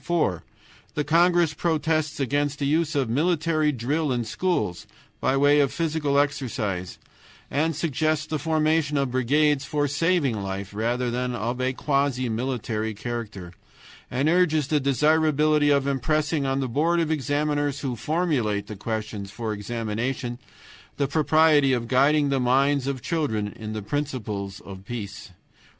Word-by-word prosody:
"4. 160 - 0 0.5
The 150 - 0
congress 170 +1 +3
protests 155 -1 0
against 145 +2 0
the 140 - -2
use 155 +2 +1
of 135 -3 +1
military 155 +3 +1
drill 145 +4 -1
in 120 -2 0
schools 110 - -2 0.3
by 135 - +1
way 145 +1 +5
of 140 -2 +3
physical 155 -4 0
exercise, 125 - -1 0.5
and 160 +3 +1
suggests 155 0 0
the 155 -1 -3
formation 155 -2 +1
of 135 -2 0
brigades 140 +3 +2
for 145 0 0
saving 145 - +1
life 95 0 -5
rather 120 +3 -1
than 125 0 -2
of 120 +3 -3
a 130 +1 0
quasi 140 -3 0
military 110 -2 -2
character; 105 -5 -6 0.6
and 135 +4 0
urges 160 -3 +3
the 150 - +3
desirability 150 +2 +3
of 140 -1 +3
impressing 145 +2 0
on 135 +1 0
the 130 - -1
Board 160 +8 +1
of 160 -1 0
Examiners 145 -1 0
who 130 -4 -2
formulate 120 - 0
the 105 0 -8
questions 105 -1 -4
for 110 +1 -4
examination 120 +4 -3 0.6
the 140 - +1
propriety 155 -1 +4
of 120 -2 -1
guiding 140 +3 +3
the 135 -1 +1
minds 135 +2 +2
of 135 -3 -3
children 135 -12 -1
in 110 +1 -7
the 110 -1 -4
principles 105 -7 -4
of 95 -1 -10
peace. 100 -3 -7
140 Hz, 145 wpm, -25 LUFS, 120-155 Hz, 0.6 s, way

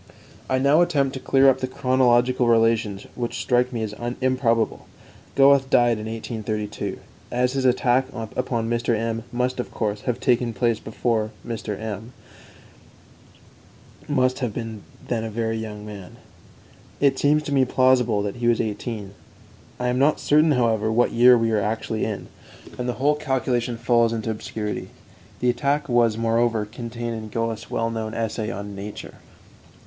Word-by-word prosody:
I 130 - +2
now 140 +5 +4
attempt 145 -6 +1
to 130 - -5
clear 135 +1 +4
up 135 - +4
the 130 - -2
chronological 125 -1 +2
relations 115 -3 +2
which 120 -1 -4
strike 125 0 +1
me 115 -3 -3
as 105 -1 -4 0.3
improbable. 130 -3 0 0.5
Goethe 135 -1 +5
died 120 -3 +3
in 110 - -6
1832. 110 -2 -4 0.3
As 125 +1 0
his 135 -1 -1
attack 130 +1 +3
upon 115 0 -3
Mr. 120 0 0
M 115 0 -3
must, 125 +1 -1
of 125 - -3
course, 105 -2 -2
have 125 0 -1
taken 120 -3 +1
place 115 -3 +1
before, 110 -1 -1 0.2
Mr. 110 -3 -4
M 110 +2 -6 1.9
must 130 -3 +1
have 125 -6 -3
been 115 -3 -5 0.3
then 115 -3 -1
a 115 - -3
very 115 +1 -2
young 105 -1 -6
man. 100 -4 -9 0.8
It 135 -2 +3
seems 150 +1 +3
to 145 - -5
me 135 -2 +4
plausible 125 -4 +3
that 100 +3 -4
he 120 -1 -1
was 120 -1 +3
eighteen. 105 -2 -4 0.7
I 125 0 0
am 125 +1 0
not 145 +3 +3
certain, 150 +1 +4
however, 110 -4 +1
what 120 +2 +2
year 125 +1 +6
we 115 -1 +1
are 105 -2 +2
actually 110 +1 -2
in, 105 -3 -4 0.5
and 125 0 -2
the - - 0
whole 140 +5 +2
calculation 130 -4 -1
falls 115 -1 +2
into 110 0 -2
obscurity. 105 -1 -4 0.5
The 125 0 +3
attack 140 +3 0
was, 120 -3 +3
moreover, 115 -1 +1
contained 115 +1 -5
in 110 -1 -7
Goethe's 115 0 -3
well 115 0 -1
known 110 -1 -4
essay 110 -1 -2
on 100 -2 -6
'Nature.'" 100 +1 -8
120 Hz, 160 wpm, -23 LUFS, 110-130 Hz, 1.9 s, year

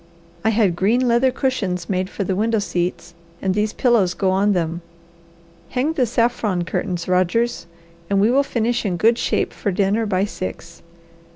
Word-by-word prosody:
I 220 - +3
had 210 -5 +2
green 230 +8 +2
leather 240 +2 +3
cushions 225 -10 -2
made 185 -1 -1
for 200 - -3
the 190 0 -1
window 225 +3 +1
seats, 175 -3 -2 0.3
and 190 -1 0
these 210 +2 0
pillows 215 -9 +2
go 190 -2 +1
on 200 +2 +2
them. 170 -1 -2 0.9
Hang 270 +5 0
the 255 -6 +1
saffron 230 -6 0
curtains, 175 0 -3
Rogers, 185 +3 +1 0.4
and 200 0 +2
we 210 +4 +4
will 270 +2 +4
finish 240 -3 -1
in 185 -5 -1
good 230 +5 +3
shape - - 0
for - - -3
dinner 200 +4 +1
by 190 -1 +1
six. 175 -4 -7
205 Hz, 170 wpm, -21 LUFS, 185-235 Hz, 0.9 s, we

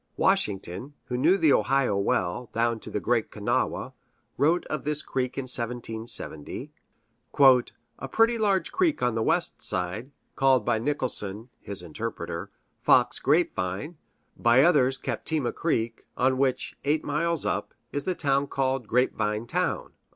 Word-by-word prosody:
Washington, 100 +7 0
who 125 - -4
knew 175 +10 +4
the 155 -7 +4
Ohio 135 -6 +2
well, 100 +3 -1
down 115 0 0
to - - -10
the - - -2
Great 115 +1 0
Kanawha, 105 -1 -1 0.4
wrote 160 +6 +2
of 155 - -4
this 150 0 0
creek 130 -1 -2
in 135 - -1
1770: 115 - -3 0.7
"A 130 0 +3
pretty 225 - +3
large 200 -3 +1
creek 360 -5 +1
on 125 -1 +2
the 115 - -1
west - - 0
side, 90 +8 -3 0.3
called 130 -4 +3
by 120 -2 +2
Nicholson 115 -5 -2
[his 100 -3 -5
interpreter] 85 -1 -5 0.3
Fox 125 -1 +4
Grape 155 +6 +2
Vine, 95 - -4 0.4
by 120 +3 +4
others 135 -6 +4
Captema 150 -4 -2
creek, 115 -8 -2
on 130 +1 +2
which, 135 -2 0
eight 150 +2 +1
miles 165 +2 -1
up, - - -2 0.2
is 145 - -2
the 185 - 0
town 140 -2 +1
called 135 -4 -1
Grape 125 +2 +2
Vine 105 +2 -1
Town." - - -2
125 Hz, 145 wpm, -26 LUFS, 110-145 Hz, 0.7 s, knew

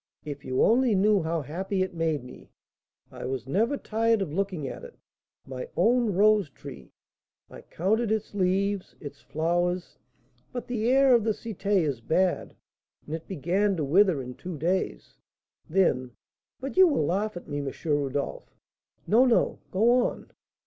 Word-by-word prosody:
If 145 -2 -6
you 130 0 +1
only 240 -1 +4
knew 205 +1 +3
how 160 -1 -2
happy 185 +6 -2
it 185 - -5
made 160 -5 -1
me, 125 - -13 0.6
I - - -8
was 130 -2 -3
never 220 - +1
tired 225 -1 +1
of 155 -6 -7
looking 185 -6 -2
at - - -7
it, 485 -1 -11 0.5
my - - -7
own 240 -3 +3
rose 210 -3 +4
tree! 70 - -11 0.6
I - - -10
counted 215 +6 -1
its 220 -1 -2
leaves, 195 0 0
its 145 -1 -9
flowers; 175 +3 -1 0.5
but 245 - -5
the 235 -1 -1
air 270 0 +5
of 235 -3 +4
the 220 0 +1
Cité 205 -2 -1
is 135 -6 -2
bad, 180 +8 0 0.5
and 150 - -7
it 160 0 -5
began 190 +4 0
to 155 - -1
wither 165 0 +3
in 125 0 -7
two 175 +4 -7
days. 175 +6 -2 0.5
Then 135 -9 +1 0.5
but 270 +1 -6
you'll 335 - +5
laugh 195 +4 -1
at 175 - -10
me, 145 -1 -3
M. 140 -1 -3
Rodolph." 145 -2 -2 0.5
"No, 230 +5 +5
no; 245 -3 +2
go 220 +6 +3 0.2
on." - - -9
185 Hz, 160 wpm, -27 LUFS, 155-215 Hz, 0.6 s, air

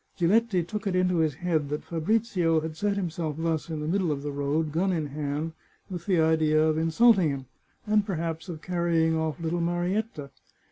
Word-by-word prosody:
Giletti 190 +1 +2
took 210 +5 -5
it 185 - 0
into 180 -1 +2
his 155 -4 +1
head 160 -3 -1
that 150 +1 -3
Fabrizio 170 -2 +1
had 160 0 -5
set 205 +3 0
him 185 -4 -2
self 155 -3 -3
thus 165 -1 -1
in 155 -2 -3
the 150 - -3
middle 180 -1 +1
of 140 -1 -3
the 145 - -3
road, 145 +2 -1
gun 180 +5 +1
in 160 -4 -1
hand, 150 +2 -3 0.4
with 175 0 -6
the 185 -4 +3
idea 160 -1 +3
of 155 0 +3
insulting 170 +3 +4
him, 135 -2 -4 0.4
and 210 -1 +3
perhaps 165 -4 -4
of 160 -2 -7
carrying 170 -2 +1
off 160 0 -2
little 165 +1 -1
Marietta. 175 -2 -2
165 Hz, 195 wpm, -27 LUFS, 155-185 Hz, 0.4 s, insulting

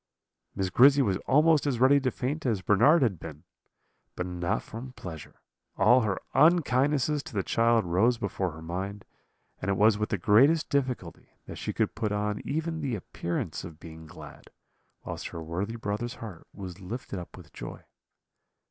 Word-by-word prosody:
"Miss 95 -1 -2
Grizzy 140 +6 +6
was 95 -5 +1
almost 150 +2 +4
as 125 -5 0
ready 135 +3 +6
to 130 -1 0
faint 140 +5 -3
as 105 -6 0
Bernard 135 - +5
had 100 -9 0
been 80 -2 -9 0.7
but 90 - -3
not 90 -1 -2
from 125 +3 -9
pleasure; 80 -9 -10 0.4
all 120 +6 +5
her 105 -4 -1
unkindnesses 150 -2 +3
to 130 - -11
the 100 - 0
child 115 0 +2
rose 105 +8 +2
before 100 -3 -2
her 80 +1 -10
mind, 95 +4 -5 0.6
and 90 - -2
it 95 - +1
was 105 0 +4
with 105 - -1
the 105 - 0
greatest 135 - +4
difficulty 125 - -2 0.2
that - - -8
she - - -3
could - - -1
put 110 -1 -2
on 105 0 -1
even 160 +2 -3
the 135 -5 -1
appearance 85 -4 -4
of 85 -4 -10
being 80 -1 -11
glad, - - -12 0.6
whilst - - -5
her 80 - -7
worthy 95 +8 -3
brother's 115 +2 -3
heart 105 -9 -10
was 95 -2 -8
lifted 100 0 -6
up 85 - -10
with - - -14
joy. - - -8
105 Hz, 175 wpm, -28 LUFS, 90-130 Hz, 0.7 s, Grizzy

